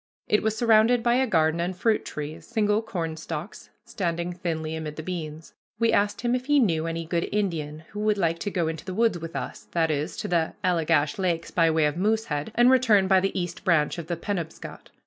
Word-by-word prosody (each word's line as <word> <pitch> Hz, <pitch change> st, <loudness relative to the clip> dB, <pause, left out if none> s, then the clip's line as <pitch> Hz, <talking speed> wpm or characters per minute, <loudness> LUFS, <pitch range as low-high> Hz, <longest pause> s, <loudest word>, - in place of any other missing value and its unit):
It 210 Hz, -, +3 dB
was 220 Hz, 0 st, -1 dB
surrounded 230 Hz, +1 st, +4 dB
by 240 Hz, 0 st, +3 dB
a 260 Hz, +1 st, +2 dB
garden 160 Hz, -4 st, +2 dB
and 180 Hz, +2 st, -2 dB
fruit 220 Hz, +3 st, +1 dB
trees, 150 Hz, +1 st, -7 dB
single 215 Hz, -2 st, +1 dB
cornstalks 165 Hz, -6 st, -5 dB, 0.2 s
standing 170 Hz, -2 st, -2 dB
thinly 160 Hz, -3 st, -3 dB
amid 155 Hz, -1 st, -5 dB
the 155 Hz, -, -6 dB
beans. 160 Hz, -3 st, -6 dB, 0.2 s
We 230 Hz, 0 st, +2 dB
asked 205 Hz, 0 st, +1 dB
him 240 Hz, 0 st, 0 dB
if 250 Hz, +1 st, -2 dB
he 290 Hz, -1 st, +4 dB
knew 165 Hz, -9 st, +1 dB
any 165 Hz, 0 st, -3 dB
good 170 Hz, +1 st, -1 dB
Indian 160 Hz, -7 st, -2 dB
who 210 Hz, -, -7 dB
would 210 Hz, 0 st, +1 dB
like 165 Hz, -3 st, 0 dB
to 205 Hz, -, -2 dB
go 175 Hz, -4 st, -1 dB
into 160 Hz, -1 st, -4 dB
the 185 Hz, -, -6 dB
woods 225 Hz, -5 st, +2 dB
with 165 Hz, +1 st, -8 dB
us, -, -, -6 dB
that 165 Hz, -2 st, +2 dB
is, 150 Hz, +1 st, -2 dB
to -, -, -3 dB
the 170 Hz, -2 st, 0 dB
Allegash 165 Hz, -3 st, +1 dB
Lakes 170 Hz, -3 st, -1 dB
by 165 Hz, -2 st, +3 dB
way 160 Hz, -1 st, +2 dB
of 150 Hz, +2 st, -1 dB
Moosehead, 210 Hz, -5 st, -1 dB
and 240 Hz, +2 st, +6 dB
return 225 Hz, -7 st, +4 dB
by 190 Hz, 0 st, +5 dB
the 195 Hz, 0 st, -1 dB
East 175 Hz, -1 st, -5 dB
Branch 160 Hz, -5 st, +2 dB
of 165 Hz, -, -7 dB
the 170 Hz, -1 st, -2 dB
Penobscot. 170 Hz, -3 st, -5 dB
175 Hz, 215 wpm, -26 LUFS, 160-210 Hz, 0.2 s, and